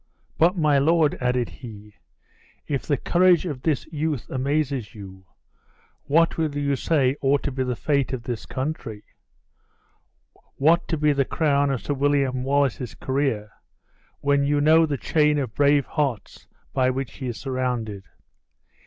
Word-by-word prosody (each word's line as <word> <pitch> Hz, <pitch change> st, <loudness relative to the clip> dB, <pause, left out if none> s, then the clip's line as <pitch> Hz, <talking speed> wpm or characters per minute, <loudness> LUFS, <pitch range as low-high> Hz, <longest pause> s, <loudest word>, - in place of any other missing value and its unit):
But, 175 Hz, +4 st, +4 dB
my 150 Hz, -4 st, +3 dB
lord," 155 Hz, +1 st, +3 dB
added 125 Hz, -1 st, 0 dB
he, 105 Hz, -4 st, -11 dB, 0.7 s
"if 140 Hz, -3 st, -3 dB
the 145 Hz, -, +1 dB
courage 180 Hz, -1 st, +3 dB
of 145 Hz, -7 st, -5 dB
this 150 Hz, -3 st, 0 dB
youth 150 Hz, -4 st, -2 dB
amazes 135 Hz, -4 st, -1 dB
you, 95 Hz, -2 st, -11 dB, 0.8 s
what 165 Hz, +3 st, +2 dB
will 155 Hz, -3 st, -1 dB
you 140 Hz, -1 st, 0 dB
say 135 Hz, -2 st, +1 dB
ought 140 Hz, +1 st, +2 dB
to 140 Hz, -, -2 dB
be 130 Hz, 0 st, -2 dB
the 125 Hz, -1 st, -2 dB
fate 140 Hz, +2 st, 0 dB
of 130 Hz, -3 st, -4 dB
this 120 Hz, -3 st, -5 dB
country? 130 Hz, -6 st, -5 dB, 1.5 s
what 160 Hz, +5 st, +3 dB
to 165 Hz, -, -1 dB
be 150 Hz, 0 st, +2 dB
the 140 Hz, -1 st, +2 dB
crown 145 Hz, -1 st, +1 dB
of 135 Hz, -4 st, -2 dB
Sir 145 Hz, -, -1 dB
William 140 Hz, -2 st, +1 dB
Wallace's 135 Hz, -3 st, 0 dB
career, 130 Hz, -6 st, -2 dB, 0.7 s
when 140 Hz, 0 st, +2 dB
you 145 Hz, +1 st, +1 dB
know 160 Hz, +2 st, +5 dB
the 145 Hz, -2 st, -2 dB
chain 150 Hz, +2 st, +2 dB
of 130 Hz, -6 st, -3 dB
brave 145 Hz, +1 st, +3 dB
hearts 140 Hz, -9 st, -3 dB, 0.3 s
by 130 Hz, -1 st, +2 dB
which 130 Hz, -2 st, -4 dB
he 130 Hz, -, -5 dB
is 120 Hz, -, -4 dB
surrounded? 125 Hz, -7 st, -3 dB
140 Hz, 155 wpm, -24 LUFS, 125-150 Hz, 1.5 s, know